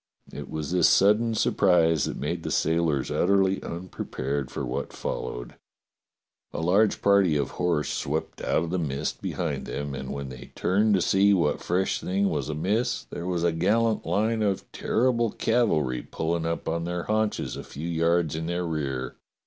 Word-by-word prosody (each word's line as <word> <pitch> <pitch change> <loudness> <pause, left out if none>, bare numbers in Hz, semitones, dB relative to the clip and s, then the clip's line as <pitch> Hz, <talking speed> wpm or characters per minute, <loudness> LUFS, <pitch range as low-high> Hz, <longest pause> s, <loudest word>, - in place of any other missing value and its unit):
It 70 +1 -7
was 80 0 -4
this 90 0 +4
sudden 110 +3 +4
surprise 85 -8 +3
that - - -4
made - - -3
the - - -4
sailors 80 -3 +1
utterly 95 +1 +2
unprepared 70 -6 -4
for - - -4
what - - -4
fol - - -3
lowed. - - -7 1.0
A - - -4
large 95 +6 +2
party 100 -5 +4
of 70 - -1
horse 85 -4 0
swept 75 +3 -3
out - - +1
of 85 - -4
the 90 - 0
mist 70 -4 -3
behind - - -3
them, 70 -1 -4
and 65 0 -5
when 70 -1 -5
they 60 -1 -11
turned 105 +3 +2
to 95 - +2
see 100 +3 +4
what 85 -5 +1
fresh 90 +2 0
thing 100 +2 +1
was 75 -2 -2
amiss 105 +11 0
there 85 - -5
was 90 -2 -1
a 85 - +3
gallant 110 +7 +1
line 110 +2 0
of 100 -3 -1
terrible 120 -1 +1
cavalry 80 - +1
pulling 80 0 -2
up 85 0 -3
on 85 +1 -1
their 90 0 -3
haunches 110 0 -1
a - - -6
few 75 +4 -7
yards 85 -1 +1
in 80 0 -3
their 85 +1 -1
rear. 70 -6 -3
85 Hz, 175 wpm, -26 LUFS, 75-100 Hz, 1.0 s, this